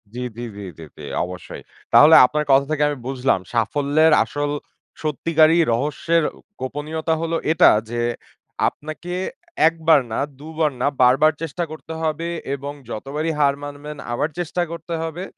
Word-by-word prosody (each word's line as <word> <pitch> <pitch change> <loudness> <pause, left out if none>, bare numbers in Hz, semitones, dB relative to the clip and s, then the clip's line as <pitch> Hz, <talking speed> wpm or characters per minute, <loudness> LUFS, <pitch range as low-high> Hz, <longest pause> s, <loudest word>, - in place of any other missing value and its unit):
জ্বী, - - -4 0.2
জ্বী, 120 0 -5
জ্বী, 100 - -8
জ্বী, 80 - -9
জ্বী, - - -10 0.2
অবশ্যই। 90 0 -9 0.3
তাহলে 155 +2 +8
আপনার 150 +4 -1
কথা 135 +1 +5
থেকে 150 -1 +1
আমি 145 - -3
বুঝলাম 130 -6 +1
সাফল্যের 145 +7 +2
আসল 145 +5 -3 0.5
সত্যিকারই 155 +2 +3
রহস্যের 150 +6 0
অ - - -15 0.3
গোপনীয়তা 155 +4 -2
হলো 165 0 -1 0.2
এটা 160 - +6 0.2
যে, 120 0 -2 0.7
আপনাকে 155 +4 -8 0.5
১ 165 - +1
বার 155 -4 +7
না - - -1 0.2
২ 150 - -10
বার 155 -2 +3
না - - +2
বারবার 135 +5 +5
চেষ্টা 165 +2 -3
করতে 160 +1 -8
হবে 160 +1 -1 0.3
এবং 140 +1 -6 0.2
যতবারই 145 +8 -3
হার 140 -1 +3
মানবেন 145 +1 -8
আবার 135 +6 0
চেষ্টা 175 +1 -2
করতে 170 0 -6
হবে। 165 +3 -5
150 Hz, 155 wpm, -21 LUFS, 135-160 Hz, 0.7 s, তাহলে